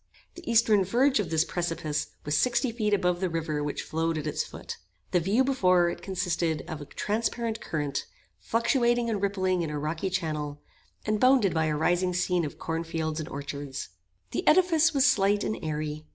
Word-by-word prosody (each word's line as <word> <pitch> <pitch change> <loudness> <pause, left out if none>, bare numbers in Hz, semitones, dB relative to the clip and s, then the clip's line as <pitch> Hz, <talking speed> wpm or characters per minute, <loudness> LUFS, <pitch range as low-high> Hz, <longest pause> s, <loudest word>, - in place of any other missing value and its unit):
The 345 -8 -6
eastern 220 -3 +5
verge 250 +7 +3
of 195 -6 -1
this 160 0 +2
precipice 165 -3 -2 0.2
was 145 +1 0
sixty 240 - +2
feet 220 -2 -1
above 180 -3 +2
the 185 - +1
river 160 -3 -2
which 145 - -3
flowed 165 0 -1
at 155 - -4
its 150 - -1
foot. - - -8 0.3
The 180 - +3
view 200 +9 +2
before 185 -10 +3
it - - -8
consisted 175 -5 -1
of 155 -2 -6
a - - -7
transparent 225 - -2
current, 145 -3 -3 0.3
fluctuating 235 0 +1
and 205 -3 -2
rippling 185 -2 0
in 165 - -2
a 150 - -3
rocky 155 +5 -2
channel, 155 -5 -3 0.5
and 215 0 0
bounded 255 -7 +4
by 160 -1 +1
a 155 -1 0
rising 175 +3 +1
scene 180 -1 +1
of 145 - -7
cornfields 165 -1 -3
and 155 +1 -5
orchards. 140 -1 -6 0.4
The - - -3
edifice 330 -2 +5
was 275 -3 +3
slight 205 -4 +3
and 215 - -1
airy. 155 0 -4
180 Hz, 180 wpm, -27 LUFS, 155-220 Hz, 0.5 s, eastern